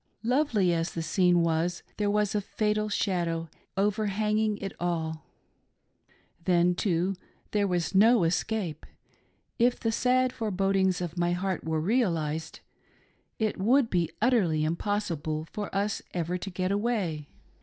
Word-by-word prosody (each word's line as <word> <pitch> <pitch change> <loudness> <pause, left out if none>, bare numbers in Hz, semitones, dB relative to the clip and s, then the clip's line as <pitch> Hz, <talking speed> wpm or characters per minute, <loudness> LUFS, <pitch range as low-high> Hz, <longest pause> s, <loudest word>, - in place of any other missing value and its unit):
Lovely 235 - +2
as 165 0 -2
the 165 - -2
scene 175 +1 +3
was, 165 +2 0
there 205 -1 +1
was 210 -1 +1
a 210 - +1
fatal 215 +1 -1
shadow 170 -5 -1 0.3
overhanging 210 +1 +1
it 195 -1 -5
all. 160 -3 -2 1.2
Then, 180 -1 +4
too, 180 0 0 0.4
there 205 -1 +2
was 175 -3 -1
no 220 +1 +6
es 165 +1 +2
cape: 185 -9 -4 0.7
if 245 +1 +3
the 225 - 0
sad 255 +2 +2
forebodings 195 -4 +1
of 175 0 -4
my 175 0 +2
heart 185 0 -2
were 160 -1 0
realised, 165 -6 -1 0.8
it 215 -3 -1
would 235 +5 +3
be 170 -3 +1
utterly 200 -10 +2
impossible 165 -3 -2
for 210 -1 -4
us 200 +1 0
ever 175 0 -1
to 180 +2 -4
get 185 0 -2
away. 200 -9 -1
190 Hz, 135 wpm, -28 LUFS, 170-210 Hz, 1.2 s, no